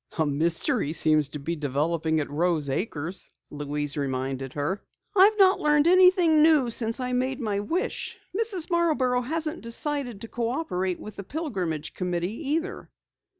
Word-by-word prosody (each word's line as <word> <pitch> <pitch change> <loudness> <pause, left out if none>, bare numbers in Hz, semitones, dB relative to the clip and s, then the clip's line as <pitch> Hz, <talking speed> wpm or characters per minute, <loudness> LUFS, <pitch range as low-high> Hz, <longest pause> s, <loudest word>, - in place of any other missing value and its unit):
"A 160 - +2
mystery 165 - +1
seems 155 -2 +3
to 150 - -6
be 165 +5 -3
developing 155 +2 0
at 145 - -3
Rose 155 -2 +1
Acres," 170 +1 -3 0.2
Louise 145 0 -3
reminded 135 -1 -3
her. 150 +8 -2 0.3
"I've 410 +3 +6
not 385 -1 +5
learned 295 +1 +3
anything 360 -3 +6
new 300 -6 +4
since 225 +1 -1
I 250 0 -2
made 260 +2 -1
my 210 -5 -1
wish. 330 - -3 0.2
Mrs. 395 -6 -1
Marborough 295 -8 +2
hasn't 315 +5 -3
decided 245 -2 -2
to 230 - -6
cooperate 230 - -2
with 215 -1 -10
the 200 - -5
Pilgrimage 185 - -4
Committee 180 +1 -2 0.2
either." 350 +6 -3
215 Hz, 150 wpm, -26 LUFS, -, 0.3 s, I've